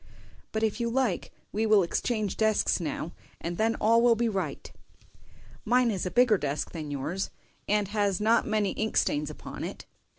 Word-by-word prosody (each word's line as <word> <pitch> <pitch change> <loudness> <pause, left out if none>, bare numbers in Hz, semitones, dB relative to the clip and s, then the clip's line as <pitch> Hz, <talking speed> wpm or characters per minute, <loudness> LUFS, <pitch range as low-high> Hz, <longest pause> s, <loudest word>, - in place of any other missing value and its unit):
"But 220 0 -1
if 220 +2 0
you 235 0 0
like 240 -6 0 0.2
we 220 +2 0
will 210 -3 +5
exchange 215 +3 -1
desks 220 -2 +2
now, 160 0 -3 0.3
and 170 0 -5
then 225 +1 +2
all 230 +2 +4
will 235 -1 +5
be 235 +1 +1
right. 195 -4 -3 0.9
Mine 245 +1 +3
is 190 -3 -2
a - - -1
bigger 245 -2 +4
desk 145 +1 -2
than 155 -3 -6
yours, 150 +7 -3 0.4
and 210 -1 +2
has 205 -3 +1
not 220 +2 +3
many 215 -2 +1
ink 220 0 -2
stains 150 0 +1
upon 150 - -8
it." - - -6
210 Hz, 175 wpm, -28 LUFS, 180-225 Hz, 0.9 s, will